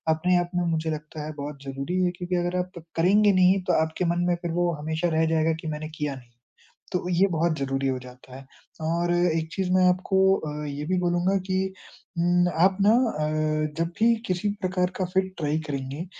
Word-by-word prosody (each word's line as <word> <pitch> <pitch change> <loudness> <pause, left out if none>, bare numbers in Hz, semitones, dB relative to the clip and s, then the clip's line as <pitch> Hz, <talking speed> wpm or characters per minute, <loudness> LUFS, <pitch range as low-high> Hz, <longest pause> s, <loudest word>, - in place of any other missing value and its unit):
अपने 180 +3 +2
आप 175 0 -1
में 175 - +1
मुझे 160 -1 -1
लगता 150 0 -6
है 155 - -6
बहुत 140 -1 -6
ज़रूरी 140 +7 -2
है 180 - +2
क्योंकि 180 0 -3
अगर 175 +1 0
आप 180 -1 -5
करेंगे 200 +5 +4
नहीं 185 +1 +4
तो 180 - +3
आपके 160 +3 -1
मन 175 - 0
में 175 - +2
फिर 170 - -3
वो 175 +1 +1
हमेशा 160 +3 -1
रह 160 - +3
जाएगा 160 0 +2
कि - - -6
मैंने 155 0 -4
किया 145 -2 -2
नहीं, 120 -2 -15 0.6
तो 180 -1 -2
ये 185 +3 +3
बहुत 165 -1 +1
ज़रूरी 135 0 -1
हो 130 -1 0
जाता 125 0 -13
है 135 - -11 0.4
और 170 +2 0
एक 165 -2 +1
चीज़ 190 -2 -1
मैं 185 0 +4
आपको 185 +2 0 0.2
अ, 150 -2 -5
ये 145 +1 -5
भी 185 +2 0
बोलूँगा 175 +2 +1
कि 185 - 0 0.6
उम, 175 +1 +3 0.2
आप 190 0 +2
ना 205 +2 +6
अ, 155 -9 0
जब 165 0 +1
भी 230 +1 +5
किसी 185 +3 0
प्रकार 180 -1 0
का 185 - 0
फिट 190 0 +1
ट्राई 155 0 0
करेंगे 140 +1 -4
अ, - - -4
170 Hz, 210 wpm, -25 LUFS, 155-180 Hz, 0.6 s, ना